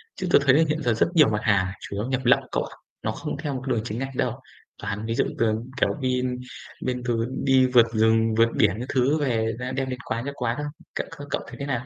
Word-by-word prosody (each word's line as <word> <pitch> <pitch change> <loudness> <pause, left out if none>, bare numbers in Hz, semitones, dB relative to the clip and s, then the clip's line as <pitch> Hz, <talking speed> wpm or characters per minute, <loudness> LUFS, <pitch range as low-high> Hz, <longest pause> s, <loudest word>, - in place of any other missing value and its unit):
Chứ 185 - -3
tớ - - +7
thấy 130 -1 +6
là 160 - +5
hiện 155 +1 0
giờ 120 - +2
rất 110 - +2
nhiều 150 -6 +7
mặt 105 -1 0
hàng 100 -4 +3
chủ - - -7
yếu 105 +2 -2
nhập 130 0 0
lậu 125 - +6
cậu - - 0
ạ, - - -10 0.3
nó - - 0
không - - -5
theo 145 -1 -3
một 130 +1 -5
đường 120 -4 +1
chính 115 0 -4
ngạch 135 0 -4
đâu. 125 +1 -1 0.4
Toàn 100 +1 -4
ví 115 0 -2
dụ 135 - +2
từ, 110 -2 +3 0.3
kiểu, - - +4
đi 125 -1 +1 0.6
bên 125 -1 -2
từ 115 -2 0 0.2
đi 130 -1 +5
vượt 120 -2 +5
rừng, 110 0 +3
vượt 115 0 +5
biển 100 +6 +3
các 125 - -6
thứ 135 +4 +2
về 115 -5 0
đem 130 0 -4
đem 135 -1 -1
đến 125 -1 -4
quán 115 +2 -3
cho 140 - -3
quán 120 -2 -1
không. 150 0 -4 0.2
Cậu, - - -3
ơ, 145 - -7
cậu - - -1
thấy - - -9
thế 140 - -3
nào? 125 -3 -2
125 Hz, 270 wpm, -25 LUFS, 115-135 Hz, 0.6 s, tớ